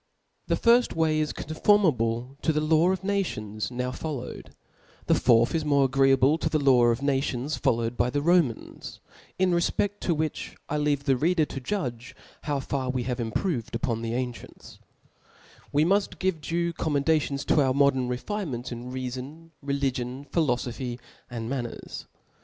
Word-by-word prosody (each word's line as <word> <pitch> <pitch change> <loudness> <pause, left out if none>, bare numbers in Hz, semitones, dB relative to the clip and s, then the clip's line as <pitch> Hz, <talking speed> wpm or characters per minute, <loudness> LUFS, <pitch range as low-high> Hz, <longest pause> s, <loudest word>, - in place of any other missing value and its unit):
The - - +2
^rft 240 +1 +3
way 160 -1 +2
is 155 -1 0
conformable 135 - +1
to 160 - +2
the 150 0 0
}aw 170 +4 +4
of 190 - -2
na^ 200 0 +1
tions 110 - -5
nowfollpwed 125 +2 -5 0.6
i - - +4
tl^e - - +2
fourth 120 -1 +4
is 160 -2 0
more 140 -2 +3
agreeable 135 +2 +3
tp - - 0
the 155 - +1
law 130 -4 +5
oJF 120 +3 +1
nations 135 0 -1
followed 115 +1 0
by 120 - +2
the 145 +2 -1
Romans; 165 -8 0 0.4
in 185 -1 +2
fefped 195 +4 0
to 170 - 0
which 155 0 -3
I 150 - -1
leave 145 -1 0
the 135 -2 +3
reader 160 +4 +2
to 135 - -6
judge 125 - -4 0.3
how 145 -2 0
far 135 -1 -3
Ive 125 -1 -1
have 125 -1 -2
improved 120 - -2
uppn 115 -1 -1
the 115 0 -3
ancients^ 125 -1 -6 0.9
We 145 +2 +3
mull 200 +4 +4 0.2
give 185 -4 -1
due 170 +3 -1
commendation^ 145 -2 0
to 150 - +3
our 130 -1 +2
modern 140 -3 +3
refinements 125 - -4
in 120 +1 -6
reafon, 130 +6 -6
religion, 135 -2 -2
phlloibphy, 125 -5 -1 0.3
a|i4 115 -2 -5
manners. 125 -2 -5
140 Hz, 160 wpm, -26 LUFS, 125-160 Hz, 0.9 s, law